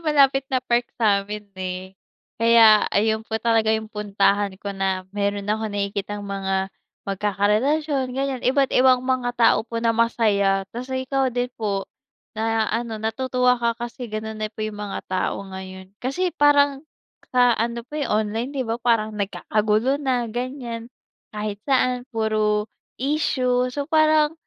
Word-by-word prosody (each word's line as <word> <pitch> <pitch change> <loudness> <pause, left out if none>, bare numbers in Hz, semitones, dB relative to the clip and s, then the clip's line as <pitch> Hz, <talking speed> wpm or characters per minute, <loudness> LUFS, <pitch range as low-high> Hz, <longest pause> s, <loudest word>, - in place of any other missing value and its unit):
malapit 275 -4 +3
na 255 -2 0
park 240 0 +1
sa'min 210 -2 0
eh, 185 0 -5 0.5
kaya 230 -2 +6
ayun 220 +1 +1
po 220 - -2
talaga 225 0 +2
yung 220 0 -7
puntahan 205 -1 +1
ko 200 +1 -5
na 190 -1 -1
meron 200 0 -1
akong 215 +1 -1
nakikitang 205 0 -3
mga, 195 -1 -2 0.3
mag-kakarelasyon 215 +9 0
ganyan 270 -2 -1
iba't 270 +2 +2
ibang 255 0 +4
mga 250 -2 -1
tao 235 - +5
po 230 - -5
na 230 - +4
masaya 205 -4 +2
kasi 260 +2 -4
ikaw 270 0 +1
din 245 0 -2
po, 200 -3 -1 0.5
na 225 0 0
ano, 230 0 -2
natutuwa 250 +3 +1
ka 235 -1 +1
kasi 240 +1 -6
ganun 215 0 -5
na 215 - -1
po 215 0 -5
yung 210 -1 -5
mga 205 -1 -4
tao 185 0 -1
ngayon. 190 0 -9
Kasi 345 +8 -1
parang, 285 -2 +4 0.5
sa 245 -1 +5
ano 235 +1 -1
po 295 +6 -7
yung 215 -6 0
online 235 +6 -3
'di 270 - 0
ba 230 -1 -3
parang 230 -3 +1
nagkakagulo 215 +5 0
na 255 -4 0
ganyan, 240 -1 -5 0.5
kahit 210 -1 -3
saan 255 -2 +1
puro, 215 -2 0 0.3
issue 255 -3 +1
so 280 +3 -3
parang, 310 -1 +4
225 Hz, 150 wpm, -23 LUFS, 210-255 Hz, 0.5 s, kaya